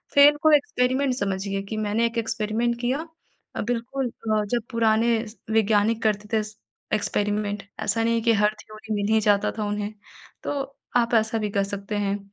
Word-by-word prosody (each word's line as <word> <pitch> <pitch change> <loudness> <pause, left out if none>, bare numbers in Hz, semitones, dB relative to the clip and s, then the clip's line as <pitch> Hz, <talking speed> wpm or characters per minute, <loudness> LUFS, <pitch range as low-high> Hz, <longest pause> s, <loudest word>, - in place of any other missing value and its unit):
fail 285 +1 +8
को 315 - +6
experiment 265 -1 +1
समझिए 195 -2 -2
कि 220 - -3
मैंने 215 +2 +1
एक 230 0 -2
एक्सपेरिमेंट 230 +1 0
किया 270 +7 -1 0.5
अ, - - -2
बिल्कुल 245 +3 -2
अ, 215 -2 -1
जब 235 +3 -1
पुराने 230 0 +3 0.3
वैज्ञानिक 220 +1 +3
करते 210 -1 0
थे 220 - +3 0.5
एक्सपेरिमेंट 205 -1 -1 0.2
ऐसा 225 +2 +1
नहीं 230 0 +2
है 230 - +1
कि 230 0 +3
हर 210 0 +3
थ्योरी 215 0 -7
मिल 205 +1 0
ही 220 - +5
जाता 205 -1 +3
था 215 - -1
उन्हें, 205 0 -3 0.5
तो 275 -1 -4 0.2
आप 235 0 +1
ऐसा 220 +1 +2
भी 210 -1 -1
कर 200 0 +1
सकते 200 +1 -5
हैं 200 0 -1
220 Hz, 175 wpm, -25 LUFS, 205-235 Hz, 0.5 s, fail